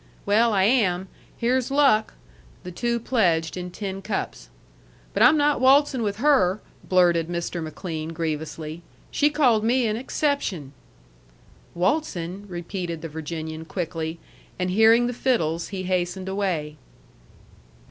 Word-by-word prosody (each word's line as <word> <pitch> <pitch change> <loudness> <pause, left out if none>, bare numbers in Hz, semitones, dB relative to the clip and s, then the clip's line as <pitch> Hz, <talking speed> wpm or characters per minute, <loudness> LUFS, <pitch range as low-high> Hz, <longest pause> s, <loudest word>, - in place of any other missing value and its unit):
"Well, 225 +3 +3
I 195 -3 +2
am. 190 -5 +2 0.3
Here's 250 +2 +1
luck!" 270 -6 +3 0.5
The 180 - -7
two 235 +5 -1
pledged 175 -10 +1
in 180 0 -5
tin 195 +1 -5
cups. - - -4 0.6
"But - - -1
I'm 310 - +7
not 290 -2 +2
waltzin' 270 0 +4
with 205 -2 -1
her," 220 -6 +3 0.2
blurted 175 -3 +3
Mr. 170 0 -3
McLean 160 0 -5
grievously. 160 0 -4 0.3
"She 295 - +3
called 255 -8 +3
me 245 +2 +2
an 215 -1 0
exception." 235 - -2 1.0
"Waltzin'," 185 - -1
repeated 175 -2 -5
the 165 - -5
Virginian 160 +1 -6
quickly, 165 -1 -4 0.4
and 180 0 -1
hearing 225 +4 +5
the 245 - -2
fiddles 170 -11 0
he 190 -2 -5
hastened 185 0 -2
away. 180 -6 -2
190 Hz, 125 wpm, -24 LUFS, 165-235 Hz, 1.0 s, I'm